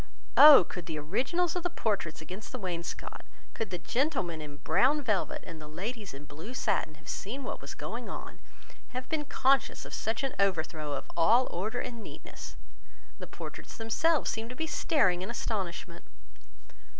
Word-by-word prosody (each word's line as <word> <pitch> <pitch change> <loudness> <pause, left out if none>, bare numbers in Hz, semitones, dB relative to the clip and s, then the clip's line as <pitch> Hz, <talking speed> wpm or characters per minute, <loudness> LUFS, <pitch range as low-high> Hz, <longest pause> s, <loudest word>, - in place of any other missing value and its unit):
Oh! 300 -1 +11
could 175 -3 -7
the 155 - -3
originals 265 - 0
of 360 - 0
the 350 - 0
portraits 195 - -1
against 185 +7 -8
the 255 - -3
wainscot, 175 -6 -4 0.3
could 225 - -3
the 180 - -2
gentlemen 185 - 0
in 145 -1 -8
brown 250 - +3
velvet 210 -7 0
and 160 -2 -8
the 150 - -8
ladies 200 +6 -5
in 140 +1 -9
blue 160 - -8
satin 155 -9 0
have 155 - -19
seen 250 +8 -4
what - - -4
was - - -7
going - - -5
on, - - -7 0.6
have 255 - -4
been 310 -2 0
conscious 270 -1 +2
of - - -9
such 225 +4 -1
an 270 - -1
overthrow 160 -6 +1
of 140 - -3
all 225 +10 +5
order 215 +7 -2
and 235 -2 -5
neatness! - - -9 0.6
The - - -6
portraits - - -8
themselves 290 +8 +2
seemed 225 +1 -4
to 250 - -7
be 320 - -1
staring 190 - +2
in 190 - -4
astonishment. 185 -6 -3
210 Hz, 175 wpm, -30 LUFS, 170-260 Hz, 0.6 s, Oh